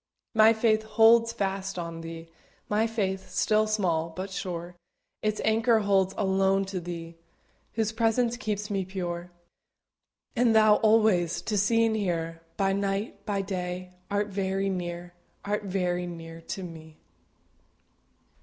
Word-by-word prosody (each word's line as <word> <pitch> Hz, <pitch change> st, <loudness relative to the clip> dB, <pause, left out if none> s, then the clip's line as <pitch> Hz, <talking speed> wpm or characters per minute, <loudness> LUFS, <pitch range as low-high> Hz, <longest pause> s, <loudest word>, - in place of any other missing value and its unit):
My 220 Hz, 0 st, +7 dB
faith 220 Hz, -1 st, +2 dB
holds 225 Hz, +1 st, +5 dB
fast 195 Hz, -2 st, -3 dB
on 165 Hz, -1 st, -5 dB
Thee, 165 Hz, 0 st, -8 dB, 0.4 s
My 215 Hz, +2 st, +2 dB
faith, 190 Hz, -4 st, -2 dB
still 215 Hz, +3 st, +2 dB
small, 175 Hz, -7 st, 0 dB
but 185 Hz, +4 st, -6 dB
sure, 180 Hz, -2 st, -5 dB, 0.5 s
Its 215 Hz, 0 st, -1 dB
anchor 225 Hz, +1 st, +3 dB
holds 195 Hz, -2 st, +2 dB
alone 195 Hz, 0 st, +2 dB
to 185 Hz, -, -1 dB
Thee, 170 Hz, -1 st, -7 dB, 0.6 s
Whose 220 Hz, -1 st, 0 dB
presence 230 Hz, +1 st, +1 dB
keeps 210 Hz, -3 st, -3 dB
me 195 Hz, -1 st, 0 dB
pure. 180 Hz, -2 st, -4 dB, 1.1 s
And 235 Hz, -2 st, +3 dB
Thou 215 Hz, -1 st, +6 dB
alway, 215 Hz, -5 st, +4 dB
To 190 Hz, +6 st, -3 dB
see 225 Hz, +3 st, +3 dB
and 220 Hz, -1 st, +1 dB
hear, 165 Hz, -5 st, -2 dB, 0.2 s
By 195 Hz, -2 st, +2 dB
night, 200 Hz, +2 st, -2 dB
by 200 Hz, -2 st, 0 dB
day, 180 Hz, -1 st, -4 dB, 0.2 s
Art 205 Hz, +1 st, 0 dB
very 195 Hz, 0 st, -1 dB
near 175 Hz, -1 st, -4 dB, 0.3 s
Art 205 Hz, 0 st, -1 dB
very 180 Hz, -2 st, -1 dB
near 165 Hz, -1 st, -8 dB
to 190 Hz, -, -4 dB
me. 160 Hz, -2 st, -10 dB
195 Hz, 135 wpm, -27 LUFS, 175-215 Hz, 1.1 s, My